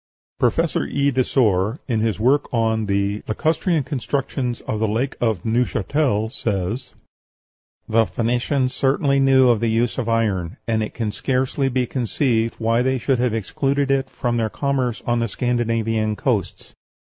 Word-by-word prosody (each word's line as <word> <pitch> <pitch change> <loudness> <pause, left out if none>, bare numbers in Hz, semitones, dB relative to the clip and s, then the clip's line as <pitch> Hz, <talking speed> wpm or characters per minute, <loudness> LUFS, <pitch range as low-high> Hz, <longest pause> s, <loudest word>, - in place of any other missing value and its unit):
Professor - - +1
E. 140 0 +1
Desor, 115 -4 +1
in 115 -5 0
his 110 -1 0
work 135 +6 +2
on 110 -2 +1
the 100 +1 0
"Lacustrian 160 - 0
Constructions 130 -2 -2
of 110 - -3
the 110 - +1
Lake 120 +6 -1
of 110 -7 0
Neuchatel," 115 0 0
says, 110 +2 -3 0.9
"The 110 0 +3
Phoenicians 125 +4 0
certainly 140 +1 +2
knew 130 -2 +5
the 115 - 0
use 115 +3 0
of 115 -2 -2
iron, 100 -7 0
and 110 -1 +1
it 110 - -4
can 110 -3 -2
scarcely 130 +4 0
be 125 -1 0
conceived 120 -2 0
why 115 +1 +1
they 130 +1 +1
should 130 +1 0
have 120 -2 +1
excluded 135 +6 0
it 135 -1 +1
from 120 -1 -2
their 110 -1 0
commerce 130 -2 -1
on 120 0 +1
the 115 - 0
Scandinavian 115 -2 0
coasts.... 110 -5 -2
120 Hz, 150 wpm, -21 LUFS, 110-130 Hz, 0.9 s, knew